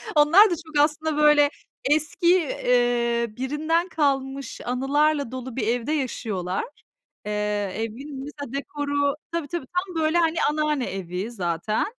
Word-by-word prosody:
Onlar 330 +9 +7
da 350 - 0
çok 310 -2 -5
aslında 305 0 -1
böyle 300 -1 +5 0.3
eski, 305 +3 +1
eee, 240 -5 +1
birinden 310 +6 0
kalmış 275 -3 -1
anılarla 280 +2 +1
dolu 260 -1 -6
bir 220 -5 -1
evde 245 +4 0
yaşıyorlar. 215 - -2 0.6
Eee, 210 - -3 0.4
evin 265 +6 -5
mesela 285 -3 -8
dekoru, 285 0 -1 0.2
tabii 335 -3 -2
tabii 330 -2 -4
tam 360 +3 -3
böyle 315 +2 +2
hani 330 -1 +2
anneanne 300 -3 0
evi 185 +3 -4
zaten. 180 0 -1
280 Hz, 130 wpm, -24 LUFS, 240-305 Hz, 0.6 s, Onlar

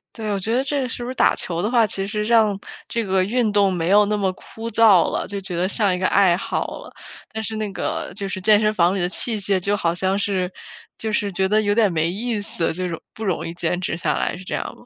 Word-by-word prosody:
对， 215 -2 -4
我 200 - -1
觉 220 +4 -2
得 260 - +2
这 275 -2 -1
是 240 - -5
不 240 - -5
是 - - -3
打 - - +3
球 170 -1 -3
的 210 - 0
话， 235 -2 +4
其 195 -1 -2
实 210 +1 -2
让 215 -3 +3 0.3
这 230 - -1
个 190 -2 +1
运 230 +1 +1
动 200 -2 +3
没 170 -1 -1
有 205 +1 +6
那 210 - 0
么 195 -2 0
枯 225 +4 -9
燥 210 -5 +5
了， - - -2
就 200 0 -5
觉 185 -3 -5
得 180 +2 +1
像 200 -1 +1
一 180 - -2
个 185 - +2
爱 190 -3 +4
好 - - -3
了， - - -11 0.4
但 220 0 -3
是 220 +1 -4
那 215 -1 -2
个 - - -3
就 200 - -4
是 190 - -3
健 210 +2 +5
身 215 0 +1
房 180 -1 +3
里 195 - -1
的 175 - 0
器 225 +3 -1
械 195 -1 +1
就 200 +3 0
好 170 -4 0
像 190 +2 0
是 190 -3 -1 0.5
就 220 -1 -3
是 205 -1 0
觉 190 +1 0
得 215 +1 +3
有 205 -1 +1
点 215 -4 +3
没 165 0 +1
意 220 +4 -2
思， 180 -4 -2
这 180 +2 -3
种 165 - -4 0.2
不 220 - -6
容 185 - -1
易 165 - -5
坚 175 +1 -1
持 170 - -2
下 - - 0
来， - - -1
是 185 - -11
这 - - -3
样 - - -2
吗？ - - -18
200 Hz, 300 characters per minute, -22 LUFS, 185-215 Hz, 0.5 s, 有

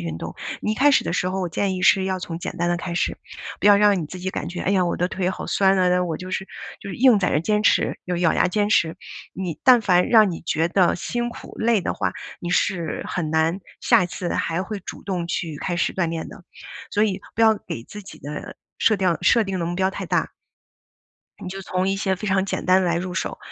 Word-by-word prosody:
运 80 -1 -5
动。 85 0 -6 0.3
你 215 - -1
一 - - -2
开 285 +5 +4
始 280 - +3
的 - - -2
时 180 - 0
候， 190 +1 -2
我 180 - -2
建 190 +3 -1
议 185 - -5
是 195 - +5
要 190 0 -1
从 170 -2 -6
简 - - -5
单 175 0 +1
的 175 - +1
开 175 0 -5
始， 180 - 0 0.4
不 - - +1
要 205 - +8
让 205 -2 +4
你 150 - -5
自 185 - -8
己 185 +1 -3
感 - - -4
觉： 180 - -6
“哎 190 - +1
呀， 185 -2 +3
我 170 - -1
的 180 - +1
腿 185 0 -1
好 - - -6
酸 195 -1 +3
啊， 180 -1 +3
那 180 0 +2
我 165 -3 -2
就 185 +1 -8
是” 190 - -3 0.3
就 200 - -6
是 - - -6
硬 250 -3 +6
在 180 - +1
这 - - +2
坚 210 +6 0
持 - - +2
又 180 -1 -2
咬 170 -2 +2
牙 - - +2
坚 205 +2 0
持。 165 -5 +2 0.4
你 180 -4 -5
但 250 -2 +7
凡 180 -4 +3
让 215 -5 +5
你 - - -6
觉 160 +1 +1
得 180 0 +2
辛 240 +6 -2
苦、 235 - -10
累 225 -2 +3
的 - - -2
话， - - -1 0.3
你 175 - -4
是 175 -2 0
很 160 -3 -3
难， 160 +4 +1 0.2
下 - - +4
一 175 - 0
次 180 0 -5
还 165 +2 -1
会 210 -1 -5
主 - - -9
动 180 -4 -3
去 165 -3 -3
开 175 - -2
始 - - 0
锻 175 -3 0
炼 165 -1 -4
的。 180 - -12 0.5
所 210 +1 +2
以 195 -2 -1 0.2
不 - - -1
要 220 -1 +6
给 115 -11 -7
自 210 - -10
己 190 - -12
的 145 +1 -7 0.2
设 215 - +3
定 185 -3 +1
设 230 -2 +4
定 190 -2 -3
的 165 - -1
目 175 - -3
标 190 0 +2
太 - - -6
大 - - 0 1.1
你 180 - -5
就 195 +1 -6
从 185 +1 -1
一 195 - 0
些 190 -1 0
非 210 - -6
常 190 0 +2
简 - - -3
单 185 +1 +5
的 - - 0
来 170 - +1
入 180 +1 -4
手。 185 - -3
185 Hz, 285 characters per minute, -23 LUFS, 175-195 Hz, 1.1 s, 要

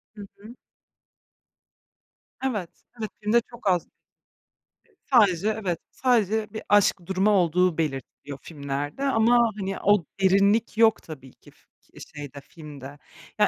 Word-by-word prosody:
Hı 205 - -10 0.2
hı. 215 +4 -12 1.9
Evet, 210 -10 -2 0.3
evet, 215 - -3
filmde 225 +3 +3
çok 235 -3 -8
az. 180 -2 +1 1.2
Sadece 205 -6 +3
evet, 175 -4 -2
sadece 220 -4 0
bir 220 - -5
aşk 200 -3 +3
durumu 190 +3 +1
olduğu 180 -2 +2
belirtiliyor 140 -2 -4
filmlerde. 145 - -5
Ama, 235 -2 +3
hani, 195 0 -4
o 205 -5 +3 0.2
derinlik 200 +4 +3
yok 225 -1 +4
tabii 135 -5 -11
ki - - -20
fi - - -31 0.5
şeyde, 140 -1 -8
filmde. 145 -3 -11 0.4
Ya, - - +5
195 Hz, 120 wpm, -25 LUFS, 155-220 Hz, 1.9 s, Ya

